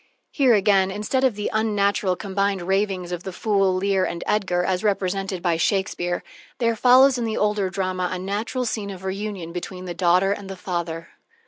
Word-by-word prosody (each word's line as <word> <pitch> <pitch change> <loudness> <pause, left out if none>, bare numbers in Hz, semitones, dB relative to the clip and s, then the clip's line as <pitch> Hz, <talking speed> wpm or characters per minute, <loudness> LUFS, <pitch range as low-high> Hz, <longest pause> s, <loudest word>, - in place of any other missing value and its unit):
Here, 260 -5 +4
again, 195 -2 +3
instead 210 +7 -1
of 255 -5 +3
the 210 0 -3
unnatural 205 -3 +1
combined 195 -1 -1
ravings 190 -1 -1
of 175 -1 -3
the 190 - -6
fool, 195 -1 +1
Lear, 190 0 +1
and 170 - -3
Edgar, 185 -4 +1
as 185 +1 -1
represented 195 -2 -1
by 170 -3 +2
Shakespeare, 175 -1 -1 0.3
there 230 -2 +1
follows 255 +3 +5
in - - -1
the 225 -1 -2
older 210 -2 +1
drama 185 -1 -2
a 185 - -2
natural 210 +7 -3
scene 215 -3 -3
of 190 -1 -8
reunion 190 -3 -4
between 180 +1 -6
the 175 - -4
daughter 180 +2 +3
and 200 -1 -4
the 195 - -6
father. 170 -3 -4
195 Hz, 185 wpm, -23 LUFS, 185-210 Hz, 0.3 s, follows